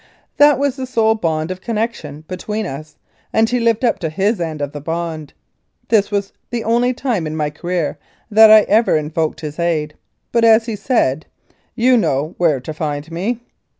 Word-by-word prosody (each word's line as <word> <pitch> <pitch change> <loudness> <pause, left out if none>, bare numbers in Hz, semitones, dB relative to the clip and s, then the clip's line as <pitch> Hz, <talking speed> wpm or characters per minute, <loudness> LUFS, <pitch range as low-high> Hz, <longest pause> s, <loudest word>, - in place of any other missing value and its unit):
That 290 0 +6
was 280 -1 -1
the 260 -1 -4
sole 225 -3 +2
bond 160 -5 -2
of 185 0 -6
connection 215 -11 -4
between 210 +4 -4
us, 155 -1 -8 0.3
and 220 0 +3
he 245 +2 0
lived 230 +1 +1
up 225 -4 +1
to 165 -4 -2
his 195 +5 0
end 160 -2 -3
of 145 -1 -3
the 145 - -7
bond. 160 -1 -4 0.6
This 215 -3 +3
was 200 -1 -2 0.2
the 235 -1 -3
only 240 +2 +2
time 240 - -2
in 155 - -4
my 150 -1 -1
career 170 -1 -3 0.3
that 220 +1 +8
I 215 0 +9
ever 215 -4 +3
invoked 155 +1 -2
his 155 +1 -7
aid, 155 -3 -1 0.4
but, 235 -1 +2
as 225 0 +5
he 225 -2 -3
said, 200 - 0 0.5
"You 250 +1 +4
know 155 - 0
where 160 -6 +2
to 140 +5 -7
find 150 0 -4
me." 210 +8 -2
185 Hz, 185 wpm, -18 LUFS, 155-230 Hz, 0.6 s, I